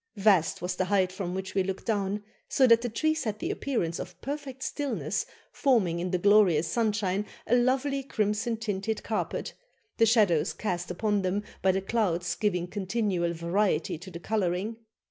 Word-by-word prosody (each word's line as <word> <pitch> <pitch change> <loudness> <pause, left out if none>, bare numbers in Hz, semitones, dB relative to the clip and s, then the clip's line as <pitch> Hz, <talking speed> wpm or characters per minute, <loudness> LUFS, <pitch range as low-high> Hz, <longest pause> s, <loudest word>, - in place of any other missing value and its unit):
Vast 195 -5 +3
was 180 0 -1
the 185 - +1
height 185 -1 +2
from 185 -1 -4
which 190 0 -4
we 195 - +2
looked 190 0 -3
down, 205 -1 -1 0.3
so 265 - +4
that 230 -2 +6
the 245 - -2
trees 315 +6 0
had 215 -3 -2
the - - -2
appearance 180 -12 -2
of - - -8
perfect 275 -2 -5
stillness, 215 - -2 0.2
forming 210 -12 +2
in 180 +1 -2
the 180 - +1
glorious 185 -5 +4
sunshine 205 -1 0 0.2
a 245 - +3
lovely 265 +3 +2
crimson 220 -2 -1
tinted 215 0 -2
carpet, 215 - -2 0.4
the 225 - +5
shadows 205 -9 +3
cast 175 -4 -3
upon 205 +3 0
them 190 +2 -1 0.2
by 190 - +4
the 190 +1 -1
clouds 190 -5 0
giving 180 -5 0
continual 190 -2 -1
variety 170 0 0
to 185 +2 -10
the 170 -2 -8
colouring. 200 +2 -1
205 Hz, 170 wpm, -28 LUFS, 180-225 Hz, 0.4 s, that